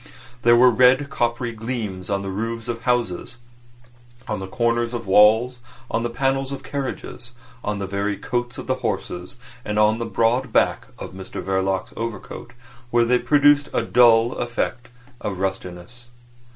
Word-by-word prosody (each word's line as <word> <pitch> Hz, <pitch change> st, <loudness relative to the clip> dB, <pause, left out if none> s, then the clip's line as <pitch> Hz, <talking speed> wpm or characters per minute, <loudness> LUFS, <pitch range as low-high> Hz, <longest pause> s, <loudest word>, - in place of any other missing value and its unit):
There 120 Hz, 0 st, +6 dB
were 125 Hz, +1 st, +6 dB
red, 130 Hz, +4 st, +4 dB
coppery 120 Hz, 0 st, -1 dB
gleams 110 Hz, -5 st, -5 dB
on 100 Hz, -1 st, -1 dB
the 95 Hz, -, -4 dB
roofs 115 Hz, +3 st, -4 dB
of 115 Hz, -1 st, -4 dB
houses, 120 Hz, -3 st, -1 dB, 0.9 s
on -, -, -2 dB
the 95 Hz, -, -6 dB
corners 120 Hz, +2 st, 0 dB
of 115 Hz, -, -5 dB
walls, 110 Hz, +5 st, +5 dB, 0.3 s
on 115 Hz, -, 0 dB
the 120 Hz, -, -2 dB
panels 135 Hz, +2 st, -1 dB
of 140 Hz, -, -6 dB
carriages, 130 Hz, -3 st, -6 dB, 0.3 s
on 105 Hz, 0 st, -2 dB
the 100 Hz, -, -3 dB
very 100 Hz, +1 st, -2 dB
coats 120 Hz, 0 st, -3 dB
of -, -, -7 dB
the 130 Hz, 0 st, -1 dB
horses, 90 Hz, +8 st, -4 dB, 0.3 s
and 105 Hz, -2 st, -3 dB
on 105 Hz, +1 st, +3 dB
the 115 Hz, -, -3 dB
broad 115 Hz, +4 st, +1 dB
back -, -, +1 dB
of -, -, -8 dB
Mr 95 Hz, 0 st, -8 dB
Verloc's 95 Hz, 0 st, -1 dB
overcoat, 115 Hz, +2 st, -6 dB, 0.4 s
where 120 Hz, 0 st, +3 dB
they 125 Hz, +1 st, +3 dB
produced 145 Hz, 0 st, +4 dB
a -, -, +2 dB
dull 115 Hz, 0 st, +5 dB
effect 120 Hz, 0 st, -3 dB, 0.3 s
of 100 Hz, -3 st, -3 dB
rustiness. 95 Hz, +5 st, -5 dB
115 Hz, 160 wpm, -22 LUFS, 105-125 Hz, 0.9 s, There